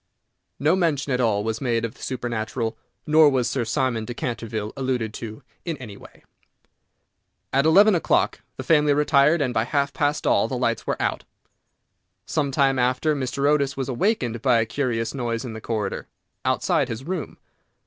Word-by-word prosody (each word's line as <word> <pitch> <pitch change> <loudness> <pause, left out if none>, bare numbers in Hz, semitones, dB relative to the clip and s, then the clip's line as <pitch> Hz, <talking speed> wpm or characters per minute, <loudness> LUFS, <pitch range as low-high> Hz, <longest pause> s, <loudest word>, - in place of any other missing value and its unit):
No 150 +6 +3
mention 150 -7 0
at 125 - +1
all 105 -4 +1
was 110 0 -3
made 115 -3 0
of 115 - -5
the - - -19
supernatural, 115 -2 -3 0.3
nor 155 0 +6
was 130 -3 +1
Sir 120 +1 -1
Simon 120 -1 0
de 120 +2 -6
Canterville 110 -4 -4
alluded 125 -5 -2
to 110 -2 -8 0.2
in 165 -3 -3
any 110 -7 -9
way. - - -16 1.3
At 135 +3 +3
eleven 200 +6 +6
o'clock 170 - +1 0.2
the - - -5
family 150 -3 +3
retired, 150 +2 +4
and 125 -2 -2
by 110 - +2
half 140 +1 0
past 145 0 0
all - - +3
the - - -3
lights - - -1
were - - -1
out. - - -1 1.0
Some 145 -2 -1
time 135 -1 +2
after, 130 +5 +1
Mr. 140 +1 -1
Otis 140 -2 +1
was 135 0 -3
awakened 125 - 0
by 125 -3 +4
a 115 - +1
curious 115 -2 -2
noise 120 -2 -3
in 120 - -6
the 110 - -8
corridor, 105 -4 -3 0.4
outside - - +1
his 115 +3 -5
room. 175 0 -4
130 Hz, 175 wpm, -24 LUFS, 115-145 Hz, 1.3 s, nor